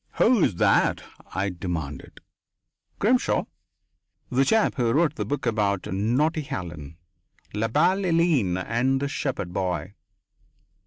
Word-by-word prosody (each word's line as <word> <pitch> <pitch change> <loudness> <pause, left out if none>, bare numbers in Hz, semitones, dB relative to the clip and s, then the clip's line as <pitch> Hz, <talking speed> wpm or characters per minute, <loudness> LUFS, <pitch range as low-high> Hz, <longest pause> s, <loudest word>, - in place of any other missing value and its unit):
"Who 240 -8 +4
is 95 - +1
that?" - - +2 0.3
I 95 +1 0
demanded. 85 -5 -6 0.8
"Grimshaw. 245 +5 +2 0.9
The 130 +2 +3
chap 220 +9 +2
who 120 -3 0
wrote 155 +2 +2
the - - -4
book 145 -2 -3
about 105 -4 0
naughty 130 - +1
Helen. 80 - -7 0.6
La 105 +2 0
belle 170 +10 +3
Hélène 165 - +1
and 125 +4 +1
the 140 - -1
shepherd 130 -10 -3
boy." 90 -1 -2
115 Hz, 120 wpm, -25 LUFS, 95-155 Hz, 0.9 s, Who